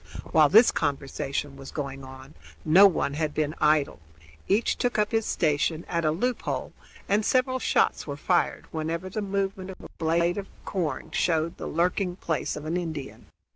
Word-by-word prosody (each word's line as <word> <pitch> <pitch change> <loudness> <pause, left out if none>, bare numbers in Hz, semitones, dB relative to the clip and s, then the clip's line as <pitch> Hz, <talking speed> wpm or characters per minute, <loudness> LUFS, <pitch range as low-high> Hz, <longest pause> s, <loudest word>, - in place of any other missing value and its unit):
While 155 -2 +5
this 225 +7 +7
conversation 140 -1 -2
was 135 0 -10
going 135 -2 -5
on 130 +2 -11 0.3
no 185 +6 +8
one 155 -6 -1
had 150 0 -2
been 155 -1 0
idle. 150 -1 +2 0.5
Each 210 +4 +2
took 245 -2 -1
up 210 -1 +1
his 225 -1 0
station 155 +1 0
at 170 -1 -1
a - - +4
loop 245 +11 -1
hole, - - -4 0.3
and 205 +2 +2
several 255 +2 +1
shots - - +1
were 140 -1 -4
fired 175 +3 0
whenever 165 +3 -3
the 215 - -3
movement 195 -1 -2
of 190 - -9
a - - -11
blade 170 +3 +1
of 195 - -7 0.2
corn 175 -6 -3
showed 165 -1 0
the - - -6
lurking 180 +2 0
place 160 -6 -2
of 150 - -7
an 165 +3 -1
Indian. 160 -6 -6
165 Hz, 175 wpm, -26 LUFS, 150-195 Hz, 0.5 s, no